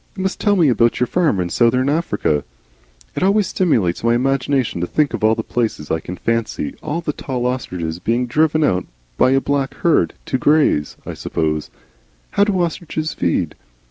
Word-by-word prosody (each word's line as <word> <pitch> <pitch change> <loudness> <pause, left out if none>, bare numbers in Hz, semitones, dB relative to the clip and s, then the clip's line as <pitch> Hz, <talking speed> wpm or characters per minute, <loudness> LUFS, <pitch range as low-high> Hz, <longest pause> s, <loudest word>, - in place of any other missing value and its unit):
"You 190 - -2
must 190 - -2
tell 205 -2 +3
me 170 -5 +4
about 120 -2 +2
your 125 - +3
farm 150 - +1
in 90 -1 -1
South 120 0 +3
Africa. 130 - 0 0.7
It - - -2
always 200 +2 +3
stimulates 110 - +1
my 115 0 +3
imagination 135 -5 0
to 90 - -1
think 150 +6 +1
of - - -2
these 110 +1 +2
places. 110 -11 -2
I 80 - +1
can 90 +3 -7
fancy 115 -6 -2
all 165 +3 -3
the 150 -3 -2
tall 125 -4 -4
ostriches 90 -10 -3
being 120 +6 0
driven 155 +5 +2
out 90 - +1 0.3
by - - +5
a 135 +1 +4
black 135 -1 -1
herd 170 - +3
to 130 - -1
graze, 145 - +2
I - - -5
suppose. 75 -2 -2 0.6
How 200 - +3
do 200 -3 0
ostriches 160 -2 -2
feed?" 85 -1 0
125 Hz, 180 wpm, -19 LUFS, 100-155 Hz, 0.7 s, by